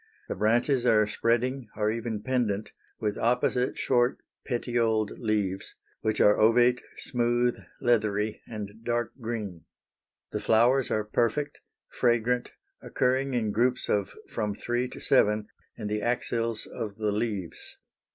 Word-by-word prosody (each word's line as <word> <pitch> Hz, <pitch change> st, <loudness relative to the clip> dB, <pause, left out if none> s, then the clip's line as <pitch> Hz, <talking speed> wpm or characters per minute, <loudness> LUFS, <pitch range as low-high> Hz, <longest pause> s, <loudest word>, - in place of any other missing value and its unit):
The -, -, -2 dB
branches 120 Hz, +4 st, +2 dB
are 110 Hz, -2 st, +5 dB
spreading 120 Hz, +4 st, 0 dB
or 105 Hz, 0 st, +1 dB
even 115 Hz, -2 st, -3 dB
pendant 115 Hz, -6 st, -1 dB, 0.3 s
with 105 Hz, -2 st, -2 dB
opposite 125 Hz, +1 st, +1 dB
short 120 Hz, -1 st, +2 dB, 0.3 s
petioled 115 Hz, -4 st, 0 dB
leaves, 105 Hz, -4 st, -1 dB, 0.3 s
which 110 Hz, -1 st, 0 dB
are 105 Hz, -, +5 dB
ovate, 120 Hz, +3 st, +5 dB, 0.2 s
smooth, 120 Hz, 0 st, +1 dB, 0.2 s
leathery, 110 Hz, -3 st, +1 dB
and 105 Hz, 0 st, -7 dB
dark 120 Hz, -1 st, -1 dB
green. 105 Hz, -7 st, -5 dB, 0.7 s
The -, -, -2 dB
flowers 120 Hz, +3 st, +3 dB
are 110 Hz, -, +1 dB
perfect, 120 Hz, +7 st, 0 dB, 0.3 s
fragrant, 120 Hz, 0 st, +1 dB, 0.3 s
occurring 130 Hz, +1 st, 0 dB
in 110 Hz, -3 st, 0 dB
groups 125 Hz, +4 st, +1 dB
of 100 Hz, -2 st, 0 dB
from 105 Hz, -3 st, -2 dB
three 120 Hz, +3 st, -1 dB
to -, -, -9 dB
seven 105 Hz, -5 st, +2 dB, 0.3 s
in 110 Hz, -, -6 dB
the 105 Hz, 0 st, -1 dB
axils 115 Hz, -1 st, -1 dB
of 110 Hz, -4 st, -6 dB
the 105 Hz, -1 st, -1 dB
leaves. 105 Hz, -5 st, -4 dB
115 Hz, 130 wpm, -28 LUFS, 105-120 Hz, 0.7 s, are